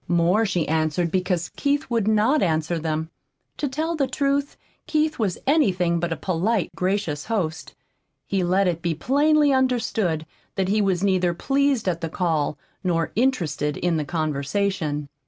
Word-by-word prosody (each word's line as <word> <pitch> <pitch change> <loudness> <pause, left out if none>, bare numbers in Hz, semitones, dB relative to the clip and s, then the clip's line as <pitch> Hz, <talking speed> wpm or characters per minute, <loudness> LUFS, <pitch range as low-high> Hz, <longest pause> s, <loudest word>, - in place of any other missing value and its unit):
More 175 +6 +3
she 175 -4 -1
answered 160 +2 0
because 180 -2 0
Keith 285 +1 0
would 225 -3 +1
not 220 +7 +3
answer 160 0 0
them. 160 0 -3 0.5
To 290 - -1
tell 315 +5 -2
the 280 -4 +1
truth, 280 0 -1 0.3
Keith 310 -1 0
was 200 -5 0
anything 185 - +2
but 170 0 -2
a 165 - -1
polite, 190 +3 0
gracious 185 -6 -1
host. 180 -8 -3 0.5
He 195 -2 0
let 185 +2 +2
it 170 -2 -1
be 170 -2 -1
plainly 290 - +3
understood 225 -11 0 0.3
that 190 -1 0
he 210 +2 +2
was 190 -2 +1
neither 185 -3 +2
pleased 275 +1 +1
at 170 -2 0
the 165 - -3
call 155 -4 -1 0.3
nor 165 -3 0
interested 165 - 0
in 175 -2 0
the 155 - -1
conversation. 155 +1 -1
185 Hz, 155 wpm, -23 LUFS, 165-235 Hz, 0.5 s, More